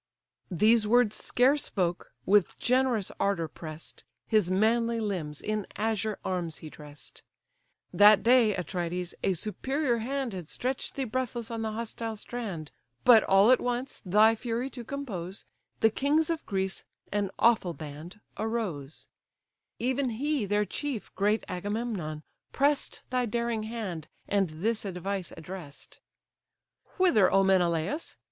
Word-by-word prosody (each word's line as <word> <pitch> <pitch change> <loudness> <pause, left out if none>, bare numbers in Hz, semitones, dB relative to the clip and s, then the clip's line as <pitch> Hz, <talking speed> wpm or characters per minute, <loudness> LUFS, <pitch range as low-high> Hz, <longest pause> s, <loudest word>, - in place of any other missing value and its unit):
These 215 +4 +4
words 240 -1 +4
scarce 270 +4 +2
spoke, 175 -3 -2
with 200 -1 +3
generous 250 -4 +1
ardour 195 -5 +1
press'd, 155 +1 -9 0.2
His 215 -5 +3
manly 230 +4 +2
limbs 175 -9 -3
in 215 -1 -2
azure 220 -1 -1
arms 175 -4 -2
he 155 - -10
dress'd. 145 -1 -11 0.7
That 205 -1 +7
day, 235 -3 +5
Atrides! 180 0 -3
a 190 - +2
superior 245 - -1
hand 260 0 -2
Had 180 -5 -7
stretch'd 255 +1 -3
thee 275 - -1
breathless 245 -1 -3
on 230 -1 -3
the 220 -1 -2
hostile 225 0 -4
strand; 205 -9 -6 0.3
But 240 -3 +9
all 195 +5 +6
at 255 - +6
once, 245 +2 -3
thy 210 +4 +5
fury 240 +3 -3
to 245 - -7
compose, 215 -9 -6 0.4
The 225 - +5
kings 300 +7 +2
of 325 -1 -4
Greece, 190 -1 -2 0.3
an 205 -1 0
awful 215 -7 +3
band, 155 +6 -9 0.2
arose; 200 -11 -3 0.7
Even 260 +2 0
he 285 -4 0
their 205 +1 +2
chief, 275 -1 -4
great 210 +2 +1
Agamemnon, 185 -5 -3 0.3
press'd 285 0 0
Thy 250 -1 +1
daring 235 0 -1
hand, 190 -9 -5 0.2
and 195 -3 +1
this 210 +9 -1
advice 195 -1 -4
address'd: 165 -3 -9 1.0
"Whither, 350 - +4
O 195 +1 +5
Menelaus! 180 - +1
215 Hz, 135 wpm, -29 LUFS, 180-240 Hz, 1.0 s, But